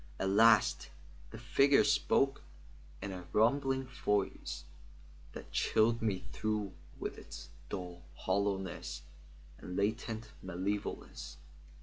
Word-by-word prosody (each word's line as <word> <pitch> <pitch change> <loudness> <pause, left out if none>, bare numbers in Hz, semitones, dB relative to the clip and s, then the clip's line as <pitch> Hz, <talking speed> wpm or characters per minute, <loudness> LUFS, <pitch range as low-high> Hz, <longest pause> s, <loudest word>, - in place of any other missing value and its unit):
At 95 - +1
last 110 +1 +5 0.4
the 115 - -9
figure 135 +4 +4
spoke 140 -1 +2 0.6
in 100 - -3
a 90 -2 -7
rumbling 130 +4 +3
voice 105 -6 -1 0.7
that - - -9
chilled 115 +2 +3
me 100 -4 -1
through 105 -2 -1 0.2
with - - -5
its - - -10 0.2
dull 90 -3 -5
hollowness 95 -1 -1 0.6
and 90 - -6
latent 110 +2 -1
malevolence. 95 -5 -4
105 Hz, 100 wpm, -34 LUFS, 95-115 Hz, 0.7 s, last